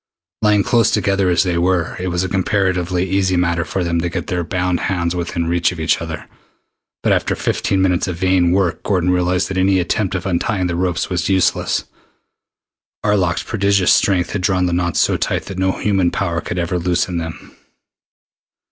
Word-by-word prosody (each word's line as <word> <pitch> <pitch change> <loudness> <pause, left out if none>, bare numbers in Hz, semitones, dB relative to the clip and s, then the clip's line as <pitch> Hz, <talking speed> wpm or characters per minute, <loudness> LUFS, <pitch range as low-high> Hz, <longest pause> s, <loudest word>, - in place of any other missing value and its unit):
Lying 105 -2 +3
close 115 -1 +3
together 100 -3 +1
as 85 0 +3
they 90 -2 0
were, 90 -1 0
it 90 - -3
was 90 0 -1
a - - -1
comparatively 95 -1 0
easy 95 -1 +1
matter 85 -1 +1
for 90 +2 -3
them 85 -1 0
to 85 - -1
get - - -4
their 90 -3 -2
bound 90 +1 -1
hands 85 -2 -1
within 85 -1 -2
reach 85 +1 +1
of 90 - -8
each 80 +1 +1
other, 80 -2 -6 0.8
but - - +2
after - - 0
fifteen 95 -1 0
minutes 90 -1 +1
of 90 - -3
vain 90 0 +2
work 90 -2 +1
Gordon 90 -3 +1
realized 90 0 +1
that 95 -1 -2
any 95 +1 +3
attempt 95 +2 -1
at 90 - -3
untying 95 +1 0
the 85 -1 -1
ropes 90 +1 -1
was 90 0 -1
useless. 95 -2 +1 1.2
Arlok's 95 -4 +1
prodigious 100 -4 +2
strength 90 -3 +2
had 100 - -2
drawn 90 -1 +1
the 90 - -1
knots 85 0 0
so - - +2
tight - - -1
that 95 -1 -7
no 95 0 +1
human 95 -4 +1
power 85 -3 -2
could 90 - -5
ever 90 +1 -1
loosen 90 0 0
them. 80 -1 -8
90 Hz, 190 wpm, -18 LUFS, 85-95 Hz, 1.2 s, Lying